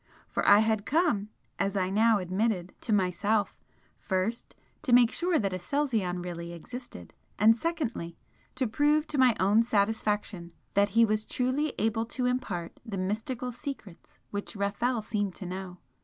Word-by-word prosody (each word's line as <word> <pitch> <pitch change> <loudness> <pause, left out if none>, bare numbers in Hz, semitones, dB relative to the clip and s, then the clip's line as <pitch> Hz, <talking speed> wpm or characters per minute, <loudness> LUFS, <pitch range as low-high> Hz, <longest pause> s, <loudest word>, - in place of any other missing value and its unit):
for - - -1
I 205 +1 +8
had 220 -2 0
come, 295 - +1 0.3
as 200 0 0
I 185 0 0
now 220 +2 +4
admitted 185 0 -1
to 230 - -4
myself, 205 +2 +1 0.4
first 190 +5 -2 0.3
to 250 - 0
make 245 -1 +7
sure 350 -1 +1
that 195 -6 0
Aselzion 185 -3 -1
really 170 -1 -6
existed 240 - -9 0.2
and 220 +2 +6
secondly, 235 - -3 0.4
to 255 0 0
prove 295 +7 +2
to 290 - -1
my 255 -3 +5
own 200 +4 +4
satisfaction 210 -5 -1 0.2
that 200 +1 +3
he 230 - +8
was 215 0 0
truly 260 +6 -1
able 225 +1 0
to 250 +1 -2
impart 225 -9 -2
the 220 -5 -5
mystical 225 +6 -2
secrets 240 - -9
which 205 +1 -5
Rafel 215 +4 -1
seemed 205 -4 -2
to 190 - -7
know. 180 0 -6
215 Hz, 155 wpm, -29 LUFS, 190-245 Hz, 0.4 s, I